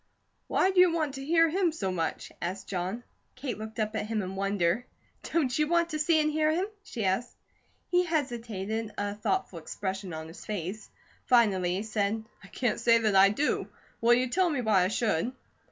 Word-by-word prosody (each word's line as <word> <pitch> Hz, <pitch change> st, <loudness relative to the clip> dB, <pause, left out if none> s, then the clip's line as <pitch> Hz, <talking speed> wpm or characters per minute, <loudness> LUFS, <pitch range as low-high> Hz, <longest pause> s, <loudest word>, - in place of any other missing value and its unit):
"Why 380 Hz, -, +2 dB
do 375 Hz, -, +2 dB
you 360 Hz, -1 st, +7 dB
want 310 Hz, -4 st, -1 dB
to 270 Hz, 0 st, -6 dB
hear 330 Hz, +3 st, +4 dB
him 350 Hz, +1 st, +1 dB
so 195 Hz, -12 st, -2 dB
much?" 165 Hz, -3 st, -3 dB
asked 190 Hz, +3 st, -4 dB
John. 190 Hz, +5 st, -3 dB, 0.3 s
Kate 255 Hz, -3 st, -4 dB
looked 220 Hz, 0 st, -7 dB
up 215 Hz, 0 st, -1 dB
at 215 Hz, -, -2 dB
him 215 Hz, -2 st, -1 dB
in 185 Hz, +1 st, -5 dB
wonder. 195 Hz, +2 st, 0 dB, 0.4 s
"Don't 270 Hz, -7 st, +1 dB
you 300 Hz, -, +3 dB
want 340 Hz, +1 st, +2 dB
to 310 Hz, -2 st, -3 dB
see 315 Hz, +1 st, +3 dB
and 305 Hz, 0 st, +2 dB
hear 310 Hz, 0 st, +2 dB
him?" 350 Hz, +4 st, +1 dB, 0.2 s
she 230 Hz, -, -4 dB
asked. 195 Hz, +6 st, 0 dB, 0.6 s
He 355 Hz, 0 st, +4 dB
hesitated, 225 Hz, -, -2 dB
a 205 Hz, 0 st, -1 dB
thoughtful 200 Hz, -4 st, -2 dB
expression 190 Hz, +3 st, -4 dB
on 160 Hz, 0 st, -6 dB
his 165 Hz, -, -11 dB
face. 205 Hz, +1 st, -5 dB, 0.4 s
Finally 195 Hz, -7 st, +3 dB
he 195 Hz, -, -2 dB
said: 215 Hz, 0 st, -1 dB, 0.2 s
"I -, -, -12 dB
can't 235 Hz, +3 st, -1 dB
say 230 Hz, 0 st, +5 dB
that 215 Hz, -3 st, +1 dB
I 195 Hz, +1 st, +8 dB
do. 280 Hz, +9 st, 0 dB, 0.3 s
Will 235 Hz, +1 st, +6 dB
you 255 Hz, +1 st, +1 dB
tell 360 Hz, +7 st, +2 dB
me 285 Hz, -6 st, -1 dB
why 205 Hz, -6 st, +3 dB
I -, -, +2 dB
should?" 220 Hz, +1 st, 0 dB
225 Hz, 200 wpm, -29 LUFS, 195-295 Hz, 0.6 s, I